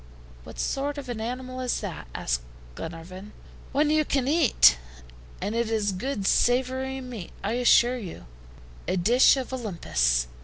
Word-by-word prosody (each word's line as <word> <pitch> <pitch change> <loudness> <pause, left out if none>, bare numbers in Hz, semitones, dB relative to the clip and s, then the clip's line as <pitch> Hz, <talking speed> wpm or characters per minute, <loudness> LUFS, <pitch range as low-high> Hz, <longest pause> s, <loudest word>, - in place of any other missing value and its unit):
"What - - -11
sort 285 +2 -2
of 275 -3 -7
an 230 -2 -4
animal 255 +2 -5
is 250 -1 -1
that?" 180 - -6
asked - - -1 0.3
Glenarvan. 180 - -8 0.4
"One 295 +2 +2
you 310 0 +3
can 275 -3 0
eat." 275 - +5 0.6
"And 210 - -3
it 230 -1 0
is 215 -2 0
good 205 +2 -3
savory 260 +4 +1
meat, 240 -8 -8
I 205 - -1
assure 245 +1 +5
you; 180 - -8 0.6
a 190 - 0
dish 240 +10 +5
of 260 -1 -4
Olympus! 60 - 0
240 Hz, 150 wpm, -26 LUFS, 190-260 Hz, 0.6 s, eat